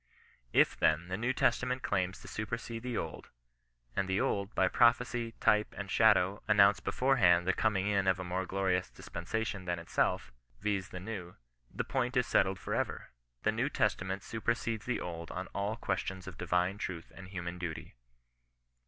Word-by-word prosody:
If, - - +4
then, 80 +3 +2
the 95 - -1
New 120 +6 0
Testament 125 0 +1
claims 95 -2 0
to - - -11
supersede 115 +2 -4
the 125 -1 -3
Old, - - -5 0.7
and 95 - 0
the 95 +1 +1
Old, 100 +1 -1
by 95 - +4
prophecy, 120 +1 +3
type, 105 0 +3
and 100 -2 -5
shadow, 105 -3 +4
announced 100 0 +5
beforehand 90 -10 +3
the 95 - +3
coming 105 -4 +1
in 100 -2 +1
of 95 0 +3
a - - -3
more 90 +1 -2
glorious 95 -1 0
dispensation 100 +2 -4
than 90 -1 -1
itself, 85 -6 0 0.3
viz. 100 +1 -1
the 90 - -6
New, 90 -3 -6 0.4
the - - -2
point 125 +1 -1
is 125 - +3
settled 95 0 +2
for - - -4
ever. - - -2 0.3
The - - +3
Neio - - -1
Testiment 95 +1 0
super 115 +1 0
cedes 115 -2 -4
the 125 - 0
Old 85 -1 -6
on 95 - -4
all 100 +2 -1
questions 95 -3 -3
of 95 -2 -8
d - - -3
v 90 - 0
'ne 90 +3 +2
truth 90 -5 -5
and 95 -1 -10
human 90 -2 -5
duty. 85 -3 -5
95 Hz, 180 wpm, -32 LUFS, 90-110 Hz, 0.7 s, announced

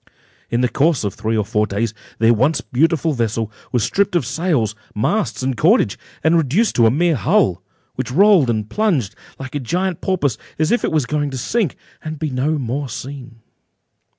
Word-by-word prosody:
In 120 - 0
the 125 - +3
course 155 +2 +1
of 100 -3 -2
three 110 0 -2
or 105 - 0
four 105 +1 0
days, 105 +2 -2 0.2
their 115 +1 +4
once 135 +8 +2
beautiful 160 +3 +1
vessel 115 -3 -1 0.2
was 120 -4 +1
stripped 200 -2 +1
of 165 -7 +2
sails, 140 - 0 0.2
masts, 190 - -1
and 130 -1 0
cordage, 155 - +3 0.3
and 160 +1 +4
reduced 170 - +2
to 115 -2 +6
a - - +5
mere 165 +7 +2
hull, 105 - +2 0.3
which - - -4
rolled 180 -1 +5
and 110 -2 -1
plunged, 155 - 0 0.2
like 130 -1 -8
a 145 - -1
huge 180 +6 -1
porpoise, 145 - 0 0.2
as 155 +1 +1
if 240 - +2
it - - 0
was 155 -5 +1
going 145 +2 -1
to 135 - -5
sink, 205 - -1 0.3
and 155 0 -5
be 155 -1 -3
no 140 +5 0
more 135 +1 -3
seen. 125 -3 -8
140 Hz, 190 wpm, -19 LUFS, 115-165 Hz, 0.3 s, to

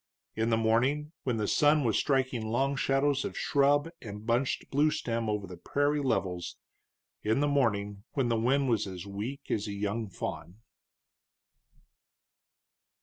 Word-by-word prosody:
In 110 +1 0
the 115 - +3
morning, 130 +7 +1
when 125 -3 0
the 105 -1 -1
sun 150 0 +4
was 115 -4 +1
striking 130 -5 +1
long 135 +4 +1
shadows 135 +1 +1
of - - -5
shrub 145 +2 +3
and 105 -1 -8
bunched 120 +3 0
bluestem 135 -6 +1
over 105 -1 -1
the 90 -1 -9
prairie 145 - 0
levels; 90 -9 -1 0.6
in 110 +4 +1
the 145 - +2
morning, 105 -8 0
when 135 -4 +1
the 115 - +1
wind 135 +4 +2
was 115 -5 +1
as 90 -1 -7
weak 110 +8 -6
as 105 0 0
a 100 - -4
young 105 +2 -2
fawn. 90 -1 -6
120 Hz, 145 wpm, -30 LUFS, 105-140 Hz, 0.6 s, sun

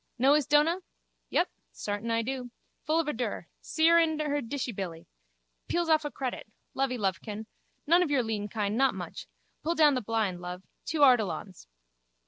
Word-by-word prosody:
Know 265 +3 +5
his 295 -2 +2
dona? 300 +4 +4 0.5
Yup, 350 - +2 0.2
sartin 205 +2 -4
I 230 0 +1
do. 255 0 -4 0.4
Full 315 +2 +2
of 330 - 0
a 300 - 0
dure. 225 -7 -3
See 320 0 +2
her 335 0 +7
in 320 -2 +2
her 295 -1 0
dishybilly. 210 -10 -4 0.6
Peels 345 -1 0
off 310 -1 +4
a - - -1
credit. 260 -5 -4 0.3
Lovey 265 -2 0
lovekin. 205 +1 -2 0.4
None 340 +4 +5
of 355 - +1
your 275 -4 +2
lean 215 -2 -2
kine, 210 -1 -2
not 270 +2 +3
much. - - -7 0.3
Pull 335 +2 -1
down 300 -3 +6
the 255 - 0
blind, 210 -5 -1
love. 180 +1 -6 0.2
Two 305 -1 -1
Ardilauns. 210 - +2
255 Hz, 175 wpm, -29 LUFS, 210-300 Hz, 0.6 s, her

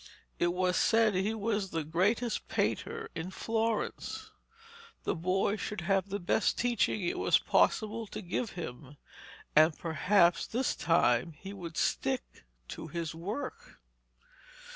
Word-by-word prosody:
It 175 - +3
was 180 0 +1
said 225 -2 +4
he 195 +4 0
was 210 -2 -1
the 165 -2 -2
greatest 205 +10 0
painter - - -2
in 165 +3 -4
Florence. 225 +2 -2 0.7
The - - 0
boy 185 +5 0
should 210 -2 -4
have 195 +1 +1
the 200 - -1
best 195 +3 +1
teaching 235 -4 +1
it 175 - -1
was - - +4
possible 220 +1 +1
to 210 - -6
give 190 +6 -2
him, 145 -4 -7 0.6
and 155 +1 +6
perhaps 170 +1 +3
this 250 +3 0
time 160 -3 +2
he 190 +6 -9
would 170 -5 -7
stick - - -1 0.2
to - - -6
his 165 0 -4
work. 255 - -6
185 Hz, 135 wpm, -31 LUFS, 165-215 Hz, 0.7 s, and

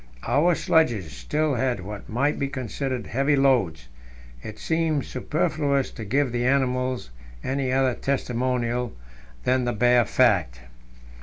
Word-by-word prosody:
Our 170 +4 +3
sledges 115 - +1
still 145 - -1
had 125 -3 0
what 100 +2 -8
might 140 +7 0
be 140 - 0
considered 130 -1 -4
heavy 140 +3 +1
loads; 120 - +2 0.5
it 110 - -8
seems 160 -3 0
superfluous 145 0 -1
to 115 - -8
give 135 +4 +1
the 120 0 -1
animals 130 - 0 0.3
any 135 -1 -1
other 130 -1 +2
testimonial 125 -2 -1 0.5
than 130 0 +2
the 120 - 0
bare 120 +1 +4
fact. - - +2
130 Hz, 130 wpm, -25 LUFS, 120-140 Hz, 0.5 s, bare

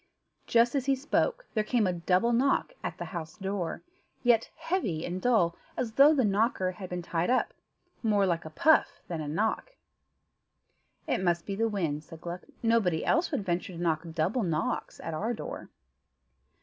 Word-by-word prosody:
Just 235 +1 +4
as 275 -2 -1
he 275 - +4
spoke 480 - 0
there 215 - +1
came 225 0 +1
a 185 - +1
double 180 +7 +2
knock 270 - +2
at - - -4
the - - -5
house 160 -2 -6
door, 190 -4 -3 0.4
yet 235 -2 +4
heavy 325 - -2
and 180 +1 -4
dull, 180 -9 +3 0.2
as 235 -3 -1
though 275 +6 +7
the 270 -6 +3
knocker 200 -2 +1
had 185 0 -8
been 180 -1 -4
tied 170 +2 -1
up 255 - +2 0.5
more 210 -3 +3
like 170 -2 0
a 155 - -7
puff 315 - +3
than 165 -3 -3
a 150 - -4
knock. 220 - -1 1.3
"It - - 0
must 170 -2 +1
be 200 - -3
the 225 +3 +1
wind," 160 -8 -2
said 160 +1 -12
Gluck; 175 +1 -6 0.2
"nobody 220 -8 +2
else 340 +2 +2
would 270 - -2
venture 180 +1 -2
to 170 - -8
knock 160 -3 +1
double 185 +10 +1
knocks 165 -5 -2
at 165 - -5
our 220 +9 -1
door." - - -7
195 Hz, 180 wpm, -29 LUFS, 170-240 Hz, 1.3 s, though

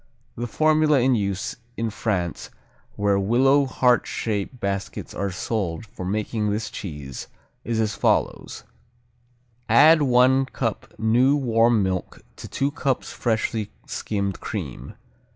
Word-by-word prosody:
The 120 +1 -4
formula 155 +2 +3
in 130 +1 +3
use 100 -4 -2 0.2
in 115 -1 -1
France, 95 -6 -2 0.5
where 100 -1 +2
willow 135 +7 +3
heart 125 -2 +2
shape 110 +3 -3
baskets 100 -1 -4
are 100 - -2
sold 95 -1 -3
for 100 - -9
making 105 +2 -1
this 105 +1 -2
cheese, 75 -8 -7 0.4
is 115 -1 -1
as 110 -1 0
follows: - - 0 1.1
Add 150 +7 +7
one 130 0 +4
cup 115 -4 -3
new 120 +5 +3
warm 115 -5 +3
milk 95 -1 -3 0.2
to - - -8
two 140 +1 -1
cups 140 -4 -2
freshly 110 -2 -1 0.2
skimmed 100 -3 -3
cream. - - -6
115 Hz, 125 wpm, -23 LUFS, 100-130 Hz, 1.1 s, Add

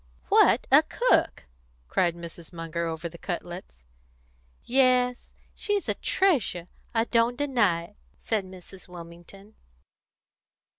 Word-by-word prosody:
"What - - +5
a - - +8
cook!" - - +1 0.4
cried 170 - +1
Mrs. 170 -1 -10
Munger, 170 0 -4
over 160 +1 -4
the 170 0 -12
cutlets. 175 - -6 0.8
"Yes, 250 -1 +2 0.3
she's 410 -2 -2
a - - +1
treasure; 255 - +1 0.2
I 225 -1 +2
don't 235 +1 +1
deny 230 -12 +1
it," - - -15 0.2
said 215 -3 -1
Mrs. 185 0 -12
Wilmington. 175 +4 -12
185 Hz, 110 wpm, -27 LUFS, 170-240 Hz, 0.8 s, a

